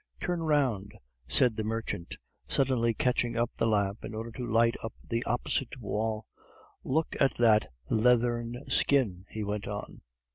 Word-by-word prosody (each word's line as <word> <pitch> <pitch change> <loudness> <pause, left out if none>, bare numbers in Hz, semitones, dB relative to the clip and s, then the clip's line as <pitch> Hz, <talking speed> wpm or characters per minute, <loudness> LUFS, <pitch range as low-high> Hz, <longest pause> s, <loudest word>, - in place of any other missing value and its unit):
"Turn 175 -2 -1
round," 135 -11 +1 0.3
said 120 - +3
the 110 - -2
merchant, 110 -5 -4 0.3
suddenly 125 -4 +2
catching 125 -2 +1
up 120 +1 +1
the - - +2
lamp 100 -1 +1
in 110 - -6
order 115 +1 -5
to 120 +1 -5
light 115 +1 +4
up 115 - -5
the 115 0 -1
opposite 120 +2 -1
wall; 110 0 -2 0.6
"look 155 +4 0
at 135 - +3
that 110 -3 +4 0.2
leathern 120 +1 +2
skin," 105 -10 +2
he 110 - -4
went 105 0 -3
on. 105 0 -6
115 Hz, 150 wpm, -29 LUFS, 110-125 Hz, 0.6 s, light